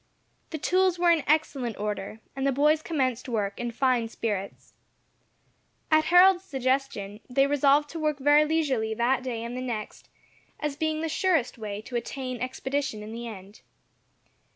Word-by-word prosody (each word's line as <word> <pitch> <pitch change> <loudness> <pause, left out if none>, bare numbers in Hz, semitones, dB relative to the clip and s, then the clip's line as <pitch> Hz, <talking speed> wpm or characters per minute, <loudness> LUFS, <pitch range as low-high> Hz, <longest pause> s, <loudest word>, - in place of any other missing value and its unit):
The 315 - -4
tools 370 +3 +2
were 345 0 +4
in 325 -4 +2
excellent 280 -7 +1
order, 210 +1 -4
and 270 0 -1
the - - +3
boys 300 +3 +3
commenced 260 -6 -1
work 205 -4 -2
in 240 0 -2
fine 240 -1 +1
spirits. 205 -4 -4 1.2
At 310 0 +5
Harold's 360 +2 +6
suggestion 260 - -2
they 270 +2 +3
resolved 285 +1 +3
to 330 - -5
work 305 -2 0
very 290 +2 +5
leisurely 275 -9 0
that 245 +3 +1
day 240 -3 -4
and 235 +1 -5
the 255 - -4
next, 230 -4 -5 0.5
as 300 -2 -2
being 315 0 -1
the 325 - -1
surest 320 -7 0
way 210 -1 -5
to 245 - -8
attain 255 0 -4
expedition 260 -3 -3
in 215 - -8
the 235 +1 -6
end. 200 -1 -10
265 Hz, 160 wpm, -27 LUFS, 230-305 Hz, 1.2 s, Harold's